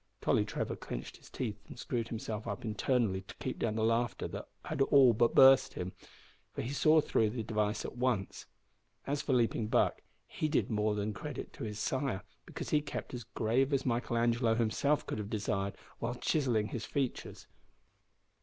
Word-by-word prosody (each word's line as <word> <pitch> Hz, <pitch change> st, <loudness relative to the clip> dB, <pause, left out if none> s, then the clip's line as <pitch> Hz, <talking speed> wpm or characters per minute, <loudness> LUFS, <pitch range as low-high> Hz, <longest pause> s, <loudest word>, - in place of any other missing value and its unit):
Tolly -, -, +2 dB
Trevor -, -, -3 dB
clenched -, -, -7 dB
his -, -, -17 dB
teeth 105 Hz, -5 st, -4 dB
and -, -, -10 dB
screwed 115 Hz, -1 st, -2 dB
himself 110 Hz, -1 st, -5 dB
up 100 Hz, +2 st, -4 dB
internally 110 Hz, -2 st, +1 dB
to 95 Hz, -, -12 dB
keep -, -, -5 dB
down 110 Hz, -2 st, 0 dB
the 110 Hz, -, 0 dB
laughter 115 Hz, +2 st, +1 dB
that -, -, -6 dB, 0.4 s
all 135 Hz, -4 st, +7 dB
but 115 Hz, +1 st, +2 dB
burst 135 Hz, 0 st, +7 dB
him, 90 Hz, +1 st, -4 dB, 0.6 s
for -, -, -2 dB
he 120 Hz, -, -3 dB
saw 155 Hz, +2 st, +5 dB
through 110 Hz, -6 st, +2 dB
the 115 Hz, +1 st, -3 dB
device 105 Hz, -1 st, -1 dB
at -, -, -6 dB
once. 125 Hz, -7 st, -1 dB, 0.6 s
As 140 Hz, +1 st, -1 dB
for 135 Hz, -, 0 dB
Leaping 115 Hz, -3 st, +2 dB
Buck, -, -, +2 dB, 0.2 s
he 155 Hz, -, -2 dB
did 150 Hz, -, +1 dB
more 105 Hz, 0 st, +1 dB
than 105 Hz, +1 st, -2 dB
credit -, -, -6 dB
to -, -, -6 dB
his 105 Hz, -1 st, -5 dB
sire, 130 Hz, -2 st, -1 dB, 0.2 s
because -, -, -6 dB
he 150 Hz, -, +4 dB
kept 145 Hz, -, -6 dB
as 120 Hz, -3 st, -5 dB
grave 120 Hz, +5 st, +1 dB
as 135 Hz, -1 st, +1 dB
Michael 120 Hz, -1 st, 0 dB
Angelo 115 Hz, 0 st, +2 dB
himself 120 Hz, +6 st, +1 dB
could -, -, -4 dB
have 105 Hz, -1 st, -4 dB
desired 100 Hz, -2 st, -1 dB, 0.2 s
while 120 Hz, +1 st, -2 dB
chiselling 120 Hz, -6 st, +1 dB
his 115 Hz, -, -4 dB
features. 135 Hz, +2 st, -3 dB
115 Hz, 180 wpm, -32 LUFS, 105-130 Hz, 0.6 s, all